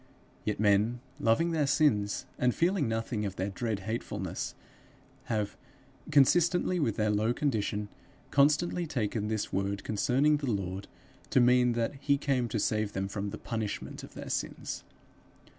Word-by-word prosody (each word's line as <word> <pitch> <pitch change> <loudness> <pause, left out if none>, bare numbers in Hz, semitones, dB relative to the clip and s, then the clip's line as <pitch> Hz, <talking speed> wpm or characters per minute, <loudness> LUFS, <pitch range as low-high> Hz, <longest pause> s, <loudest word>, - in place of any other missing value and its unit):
Yet - - -1
men, 105 +3 +3 0.2
loving 165 +10 +3
their 155 -3 +1
sins, 130 -9 +2
and 125 -1 +2
feeling 170 -4 +2
nothing 115 -1 -2
of 100 -2 -3
their 95 +1 -2
dread 110 -1 -2
hatefulness, 110 +4 -4 0.7
have, 105 -3 -1 0.5
consistently 175 +5 +4
with 115 -9 +1
their 110 -1 +1
low 110 +3 +1
condition, 105 -7 -1 0.4
constantly 155 +5 +3
taken 110 -5 -1
this 110 -1 -2
word 100 +1 -1
concerning 135 +8 +2
the 140 -3 -3
Lord 95 -1 -3 0.4
to - - +4
mean 125 0 +5
that 115 +2 0
he 140 0 +2
came 135 -4 0
to 110 -1 -2
save 105 0 0
them 95 0 -1
from 100 0 -3
the 110 - -6
punishment 110 -3 -4
of - - -11
their - - -6
sins. - - -3
115 Hz, 150 wpm, -30 LUFS, 105-140 Hz, 0.7 s, mean